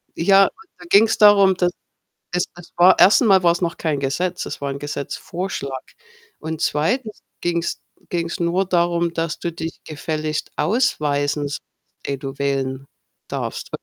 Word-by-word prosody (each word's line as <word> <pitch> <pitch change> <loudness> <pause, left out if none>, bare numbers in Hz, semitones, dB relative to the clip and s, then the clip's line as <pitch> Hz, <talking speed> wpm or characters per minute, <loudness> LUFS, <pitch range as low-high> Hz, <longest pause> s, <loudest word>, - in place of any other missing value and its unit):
Ja 195 +3 +5
aber - - -3 0.3
da 180 - -13
ging's 220 +3 +5
darum, 200 -3 +6
dass 175 -1 +2 0.6
es 180 - +2
das 175 -1 -14
war 180 +2 +6
erst 200 - +7
einmal 195 -6 +5
war's 170 +1 +3
noch 170 -1 -1
kein 150 -4 -1
Gesetz, 175 +7 -2
es - - -6
war 140 - -1
'n 135 - -5
Gesetzvorschlag 145 0 -5 0.5
und 160 0 -5
2. 215 - -1 0.2
ging's 170 -1 -1 0.3
ging's 170 0 -3
nur 175 +3 +1
darum, 170 -1 +1
dass 165 -1 -2
du 170 - -3
dich 165 0 -6
gefälligst 155 0 -3
ausweisen 150 - 0
sollst, 145 - -5 0.5
ehe 140 - -2
du 135 0 -7
wählen 135 -1 -2 0.4
darfst - - -4
170 Hz, 150 wpm, -21 LUFS, 145-180 Hz, 0.6 s, erst